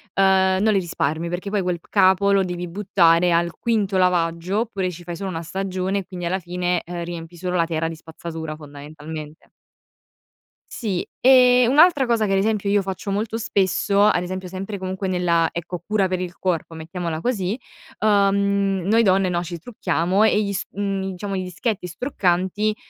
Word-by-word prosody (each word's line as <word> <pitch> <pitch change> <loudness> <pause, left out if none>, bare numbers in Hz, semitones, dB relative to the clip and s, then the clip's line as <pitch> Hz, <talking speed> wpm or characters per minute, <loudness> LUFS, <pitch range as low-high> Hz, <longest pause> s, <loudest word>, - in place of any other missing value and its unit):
uhm, 190 -1 +4
non 215 +1 +3
li 195 - +3
risparmi, 165 -2 -2
perché 175 +3 -4
poi 205 -1 0
quel 180 -2 -2
capo 195 0 +4
lo 195 -1 +4
devi 180 -1 -4
buttare 175 -2 +3
al 170 -1 +1
quinto 210 -4 0
lavaggio, 180 +2 +1
oppure 200 -6 -2
ci 175 0 -10
fai 175 0 -6
solo 195 +3 -4
1 165 -2 -4
stagione 190 +2 -2
e 195 - -7
quindi 180 -1 -7
alla 185 +3 0
fine, 180 0 -1
ehm, 175 0 -5
riempi 170 0 -8
solo 180 +1 -3
la 170 -2 +3
terra 165 -1 -1
di 165 - -5
spazzatura, 160 -1 -7
fondamentalmente. 150 +1 -10 1.2
Sì, 200 -7 -3
e 250 -1 +6
un'altra 290 +1 +5
cosa 230 -3 +1
che 195 - 0
ad - - +3
esempio 205 0 0
io 200 0 +3
faccio 190 +1 -5
molto 215 +3 -2
spesso, 200 -1 +1
ad 210 -4 +4
esempio 185 +1 -5
sempre 195 +3 -5
comunque 190 +1 -4
nella, 175 -3 +2
ecco, 170 +1 -5
cura 210 -2 +1
per 185 -1 -2
il 180 -1 -5
corpo, 170 -3 -2
mettiamola 165 0 -4
così, 210 -1 -1 0.4
uhm, 200 -2 +2
noi 220 +4 +4
donne, 190 -3 +3
no, 175 -1 0
ci 170 0 -6
trucchiamo 185 -1 0
e 215 -1 +3
gli 200 -1 -2
s 195 - -2
mhmm, 195 -1 -2
diciamo, 200 +2 -5
i 185 - -1
dischetti 185 +2 -3
struccanti, 190 - 0
185 Hz, 180 wpm, -22 LUFS, 175-200 Hz, 1.2 s, e